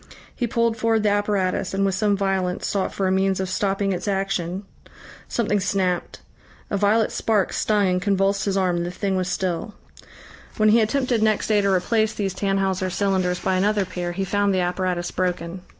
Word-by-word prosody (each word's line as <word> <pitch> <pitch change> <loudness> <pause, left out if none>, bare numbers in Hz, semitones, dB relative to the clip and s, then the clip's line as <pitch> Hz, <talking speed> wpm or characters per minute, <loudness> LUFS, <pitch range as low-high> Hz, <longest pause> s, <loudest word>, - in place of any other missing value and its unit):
He 240 - -1
pulled 230 -1 +1
forward 225 -1 +1
the 210 - +3
apparatus, 200 -2 0
and 195 0 +1
with 195 - +1
some 205 +1 +1
violence 190 -2 -1
sought 195 -2 -1
for 195 - -2
a 185 - +2
means 190 0 +1
of 190 - -1
stopping 195 +1 0
its 180 - -4
action. 195 -2 -1 0.6
Something 210 -3 0
snapped. 185 -2 -1 0.5
A - - +1
violet 210 +3 +2
spark 210 -4 0
stung 210 -2 +1
and 180 0 +1
convulsed 195 0 +1
his 195 -1 0
arm 180 -2 +1
and 170 - -1
the - - -3
thing 190 +2 -2
was 185 -1 -1
still. 185 +4 -2 0.8
When 215 0 +4
he 225 +2 +5
attempted 245 0 +1
next 215 -1 +1
day 210 -1 +4
to 200 - 0
replace 215 +4 +1
these 195 -3 -2
Tannhauser 195 -2 0
cylinders 185 -2 0
by 190 -1 +1
another 205 +1 +1
pair, 175 -1 -4
he 190 +2 -2
found 200 0 +1
the 185 - +1
apparatus 180 -1 -1
broken.... 180 -1 -2
195 Hz, 190 wpm, -23 LUFS, 185-210 Hz, 0.8 s, he